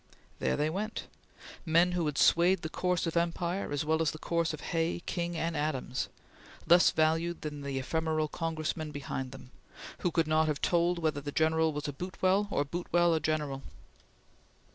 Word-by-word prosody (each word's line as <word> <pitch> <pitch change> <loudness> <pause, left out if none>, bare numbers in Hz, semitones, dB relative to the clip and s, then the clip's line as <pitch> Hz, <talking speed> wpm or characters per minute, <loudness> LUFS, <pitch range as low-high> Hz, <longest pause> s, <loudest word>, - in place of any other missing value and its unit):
There - - 0
they 150 +1 +1
went! 210 +5 -3 0.6
Men 170 +1 +4
who 175 -3 0
had 150 - -2
swayed 175 +2 +4
the 160 - -3
course 180 +1 0
of 165 - -3
empire 170 +2 -1
as 145 +1 -1
well 160 +1 +2
as 160 - +2
the - - -6
course 170 +1 0
of 155 - -7
Hay, 165 +1 0
King, 175 -1 -2
and 165 0 -1
Adams, 135 -4 -2 0.6
less 175 +2 +6
valued 165 +2 +1
than 150 -1 -5
the 140 -1 -3
ephemeral 155 +3 0
Congressman 155 -1 -3
behind 135 -3 -5
them, 130 -1 -12 0.5
who 180 - +1
could 165 -1 +1
not 155 0 +3
have 150 -2 -1
told 175 0 +2
whether 155 -3 -1
the 145 0 -5
general 160 +1 +2
was 150 0 -4
a 145 - -3
Boutwell 185 +5 0
or 145 - 0
Boutwell 175 +2 +1
a 160 - +2
general. 150 -4 -1
160 Hz, 180 wpm, -31 LUFS, 150-170 Hz, 0.6 s, less